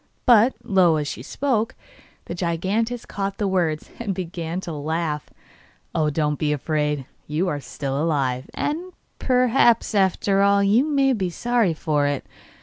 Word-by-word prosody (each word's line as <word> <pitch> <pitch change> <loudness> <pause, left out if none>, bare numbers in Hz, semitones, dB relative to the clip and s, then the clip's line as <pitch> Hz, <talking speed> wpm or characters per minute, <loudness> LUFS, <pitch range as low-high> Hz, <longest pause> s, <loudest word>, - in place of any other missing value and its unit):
But, 240 0 +6
low 185 -7 +4
as 150 -1 -1
she - - -5
spoke, 245 -6 -1 0.5
the - - -5
giantess 195 +8 -1
caught 195 -1 -4
the 210 -3 0
words, 170 -5 -1
and 205 -5 -2
began 170 -1 -4
to 175 - -6
laugh. 155 0 -3 0.6
'Oh, 155 -2 +1
don't 150 -1 -1
be 150 -1 +1
afraid; 150 -1 -1 0.2
you 155 +5 0
are 145 - -2
still 135 +1 -3
alive, 135 -5 0
and 345 +5 -3 0.3
perhaps, 250 -3 +3
after 195 0 +2
all, 200 0 +4
you 210 +6 +4
may 275 -3 +2
be 190 -6 -1
sorry 230 -2 +1
for 150 -2 0
it. 145 -2 -2
180 Hz, 150 wpm, -23 LUFS, 150-225 Hz, 0.6 s, But